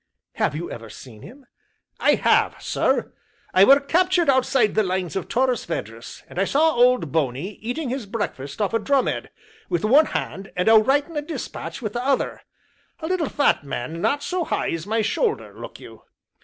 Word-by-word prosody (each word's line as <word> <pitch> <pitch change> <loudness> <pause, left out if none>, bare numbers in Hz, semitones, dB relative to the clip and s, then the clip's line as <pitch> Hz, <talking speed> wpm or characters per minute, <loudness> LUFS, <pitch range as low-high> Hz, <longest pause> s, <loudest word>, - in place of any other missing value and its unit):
"Have - - 0
you 170 +3 -5
ever 115 -1 -8
seen 110 -1 -12
him?" 270 +2 -13 0.5
"I - - +4
have, - - +2
sir; - - 0 0.4
I 185 - +6
were 275 +7 +7
captured 345 +2 +2
outside 260 -4 +2
the 215 - +3
Lines 185 -4 -2
of 190 - -3
Torres 250 -1 +1
Vedras, 115 -7 -6
and - - -7
I - - +4
saw 310 +9 +3
Old 245 - +3
Bony 145 +4 -1
eating 250 +6 -3
his 255 -4 -4
breakfast 145 - -5
off 205 - -2
a 230 - +2
drum 275 +3 +2
head - - -3 0.4
wi' 175 - 0
one 290 +7 +6
hand 195 0 -4
and 180 +2 -1
a 225 - +7
writing 280 +8 +3
a - - 0
dispatch 295 -3 -6
wi' 215 - -1
the 240 +4 -4
other 275 0 0 0.6
a 320 - -6
little 345 -2 -1
fat 285 - +2
man 140 +4 -5
not 285 +7 0
so 365 -1 -1
high - - -1
as 165 +2 -4
my 220 +1 +1
shoulder, 440 - -1
look - - -9
you. - - -13
230 Hz, 190 wpm, -23 LUFS, 175-280 Hz, 0.6 s, were